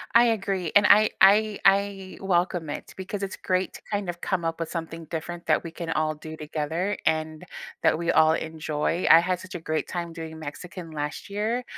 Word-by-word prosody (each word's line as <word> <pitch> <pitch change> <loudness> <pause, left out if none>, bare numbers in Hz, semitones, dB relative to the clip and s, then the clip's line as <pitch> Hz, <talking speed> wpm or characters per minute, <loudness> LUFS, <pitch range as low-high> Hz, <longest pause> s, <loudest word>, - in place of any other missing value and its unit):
I 235 - +8
agree, 195 -7 0
and 205 0 +7
I 215 +1 +7
I 210 +2 +5
I 195 -1 +2
welcome 175 -3 0
it, 145 - -6
because 190 +2 -5
it's 195 - -4
great 185 0 -1
to - - -11
kind 205 -3 -1
of 175 0 -5
come 180 -3 -1
up 165 0 -2
with 165 - -3
something 165 -1 -5
different 170 +2 -6
that 155 - +3
we 165 - -7
can 170 -1 -6
all 155 -1 0
do 155 +1 -9
together, 160 +6 -2
and 155 +1 0 0.4
that - - +4
we 170 +1 0
all 160 0 +5
enjoy. 160 +1 -2
I 165 - +10
had 180 +1 0
such 185 0 -10
a 175 - -3
great 155 -1 -2
time 170 -2 -4
doing 160 -1 -7
Mexican 160 +3 -8
last 150 +4 -5
year. 215 +5 -1
170 Hz, 205 wpm, -26 LUFS, 160-195 Hz, 0.4 s, I